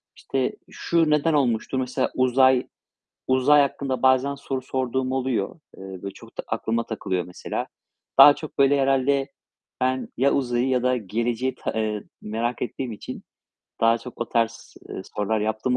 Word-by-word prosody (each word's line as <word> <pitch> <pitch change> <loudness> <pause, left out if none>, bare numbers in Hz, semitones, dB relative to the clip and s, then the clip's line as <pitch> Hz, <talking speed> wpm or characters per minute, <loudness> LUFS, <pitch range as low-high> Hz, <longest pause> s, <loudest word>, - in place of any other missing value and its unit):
işte, 130 -1 -2 0.2
"Şu 165 -2 +1
neden 150 +2 +2
olmuştur?" 130 -2 +1
Mesela 130 0 -1
uzay 130 0 +4 0.6
uzay 130 +3 +5
hakkında 135 -1 -1
bazen 130 +2 +3
soru 135 -1 -4
sorduğum 130 0 -2
oluyor. 130 -1 -1 0.2
Eee, - - -11 0.2
böyle 100 - -4
çok - - -16
da - - -2
aklıma 115 +1 -1
takılıyor 95 -5 -2
mesela. 90 - -5 0.5
Daha 145 - +10
çok, 155 0 -9
böyle, 140 0 +4
herhâlde 135 +1 +2 0.5
ben 130 0 0
ya 140 +3 +3
uzayı 125 -2 0
ya 130 -2 +1
da 125 0 +2
geleceği 120 +4 -2
ta - - -4
eee, 110 -2 -2 0.2
merak 115 +3 -2
ettiğim 125 0 -4
için 105 - -8 0.6
daha 115 +1 +4
çok 120 +1 -11
o 120 - -2
tarz, 115 -1 -1 0.2
ııı, - - -5
sorular 105 +1 0
yaptığım 110 +4 0
130 Hz, 155 wpm, -24 LUFS, 115-135 Hz, 0.6 s, Daha